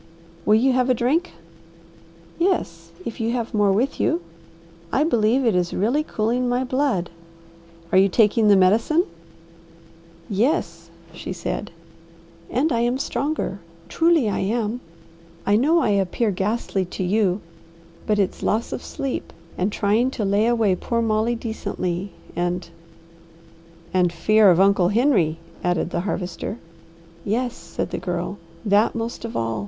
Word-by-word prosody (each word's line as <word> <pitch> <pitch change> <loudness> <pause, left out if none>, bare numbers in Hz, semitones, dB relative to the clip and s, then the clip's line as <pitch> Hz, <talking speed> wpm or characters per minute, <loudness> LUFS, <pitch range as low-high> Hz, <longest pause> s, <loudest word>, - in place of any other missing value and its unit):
"Will 210 - +6
you 255 +4 +3
have 255 0 +2
a 255 - +4
drink?" 285 +10 0 1.1
"Yes, 170 - -1 0.2
if 230 - -6
you 230 +1 0
have 235 -1 -3
more 205 -2 +3
with 240 +8 0
you. 175 - +1 0.7
I 280 - +2
believe 245 -3 +2
it 225 - +3
is 180 -1 0
really 240 +10 +1
cooling 245 -2 -1
my 245 +1 +1
blood." 255 -9 0 0.8
"Are 185 - +6
you 195 +1 +5
taking 215 +2 +3
the 205 - +7
medicine?" 220 - +4 1.2
"Yes," 180 - -1 0.2
she 175 - -7
said, 185 +3 -4 0.8
"and 280 +6 +1
I 235 - +1
am 240 +2 +1
stronger. 280 -7 -2 0.3
Truly 330 -7 +3
I 205 - -1
am. 220 +4 -1 0.6
I 200 - +3
know 310 +9 +3
I - - +1
appear 200 +3 +1
ghastly 195 0 -1
to 180 - -5
you, 190 0 +1 0.7
but 210 - +2
it's 195 -2 0
loss 225 +2 0
of - - -5
sleep, 275 -3 -4 0.2
and 190 +3 0
trying 215 +6 +2
to 210 - 0
lay 200 +3 +2
away 230 -5 +3
poor 235 +6 -3
Aunt 230 -1 +1
Molly 220 +2 +1
decently, 200 -5 -4 0.2
and 175 +1 -1 0.6
" 165 +1 -25
"And 180 -2 +3
fear 215 +4 +4
of 175 -1 +4
Uncle 195 -2 +4
Henry," 205 - +2 0.3
added 175 -1 0
the - - -1
Harvester. 180 +3 -4 0.7
"Yes," 240 +4 -1
said - - -5
the - - -3
Girl. 180 +2 -3 0.3
"That 205 +2 +3
most 230 0 -4
of 230 - -4
all! 115 -1 -1
215 Hz, 150 wpm, -22 LUFS, 185-240 Hz, 1.2 s, the